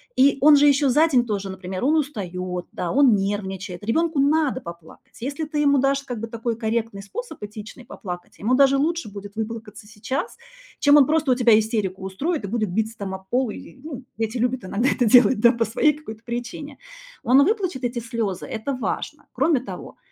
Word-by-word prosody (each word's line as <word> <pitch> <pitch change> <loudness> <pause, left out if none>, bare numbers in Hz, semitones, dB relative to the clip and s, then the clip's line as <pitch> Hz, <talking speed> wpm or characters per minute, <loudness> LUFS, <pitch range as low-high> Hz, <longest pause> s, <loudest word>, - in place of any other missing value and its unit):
И 275 +1 +4
он 295 +1 +8
же 290 +1 +5
ещё 280 -1 +4
за 305 +6 +4
день 255 -6 +2
тоже, 200 -3 -3
например, 185 +1 -6
он 300 +4 +3
устаёт, 185 - -3
да, 175 - -3
он 265 -5 +5
нервничает. 195 -1 -3
Ребёнку 315 +8 0
надо 285 -2 +2
поплакать. 170 +6 -13
Если 280 +5 -3
ты 300 0 -5
ему 285 -2 +3
дашь 275 +1 +1
как 245 -4 -6
бы 230 - -5
такой 230 0 -3
корректный 225 -2 -2
способ, 320 - -8
этичный, 210 +4 -9
поплакать, 180 -6 -8
ему 230 +5 0
даже 275 +1 +5
лучше 320 -3 -1
будет 200 0 -10
выплакаться 220 -1 -6
сейчас, 220 - -4 0.4
чем 290 0 +6
он 275 -3 +6
просто 305 -3 +2
у - - +4
тебя 235 -3 +5
истерику 210 -4 -1
устроит 275 - -2
и - - -4
будет 215 0 -1
биться 220 +4 -2
там 190 -1 -4
об 190 0 -12
пол 255 -1 +1
или, 210 - -9
ну. 275 -5 -7 0.2
Дети 225 +2 -2
любят 250 +2 -1
иногда 230 +7 0
это 250 - +1
делать, 245 0 +6
да, 235 +2 +6
по 230 -2 0
своей 280 +7 +2
какой-то 230 -7 -10
причине. 245 +4 -6 0.5
Он 265 +4 +5
выплачет 370 - -1
эти 245 0 -2
слёзы, 225 -5 -3
это 230 +5 -4
важно. 255 - -4
Кроме 305 -7 +2
того, - - -9
235 Hz, 195 wpm, -23 LUFS, 210-280 Hz, 0.5 s, он